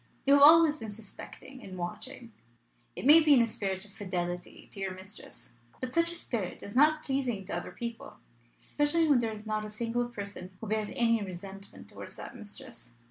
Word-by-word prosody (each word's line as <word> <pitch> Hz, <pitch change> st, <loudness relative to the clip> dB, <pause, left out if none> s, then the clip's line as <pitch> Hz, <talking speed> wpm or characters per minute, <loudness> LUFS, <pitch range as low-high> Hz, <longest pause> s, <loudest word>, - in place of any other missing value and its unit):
You 280 Hz, -, +6 dB
have 285 Hz, -, +6 dB
always 310 Hz, +1 st, +8 dB
been 220 Hz, -6 st, -6 dB
suspecting 225 Hz, +5 st, -10 dB
and 185 Hz, -4 st, -9 dB
watching. 215 Hz, +7 st, -6 dB, 0.6 s
It -, -, -5 dB
may 300 Hz, +4 st, +10 dB
be 305 Hz, -3 st, +6 dB
in 245 Hz, -, +6 dB
a -, -, +3 dB
spirit 200 Hz, -4 st, -3 dB
of 205 Hz, -, -15 dB
fidelity 180 Hz, -4 st, -4 dB
to 200 Hz, -, -8 dB
your 190 Hz, -1 st, -3 dB
mistress; 185 Hz, -, -10 dB, 0.3 s
but 255 Hz, -1 st, -5 dB
such 335 Hz, 0 st, +2 dB
a -, -, -4 dB
spirit 230 Hz, -, -4 dB
is 200 Hz, -, -8 dB
not 305 Hz, +3 st, +5 dB
pleasing 255 Hz, -8 st, -1 dB
to -, -, -3 dB
other -, -, -3 dB
people, 235 Hz, -1 st, -7 dB, 0.5 s
especially 300 Hz, +3 st, +3 dB
when 285 Hz, -4 st, +5 dB
there 230 Hz, -1 st, 0 dB
is 215 Hz, 0 st, -8 dB
not 215 Hz, 0 st, -1 dB
a 210 Hz, -, -6 dB
single 235 Hz, +3 st, -1 dB
person 200 Hz, -5 st, -8 dB
who -, -, -7 dB
bears 215 Hz, 0 st, -1 dB
any 230 Hz, -2 st, +3 dB
resentment 195 Hz, +1 st, -8 dB
towards -, -, -10 dB
that -, -, -9 dB
mistress. 160 Hz, -, -10 dB
220 Hz, 195 wpm, -30 LUFS, 195-265 Hz, 0.6 s, may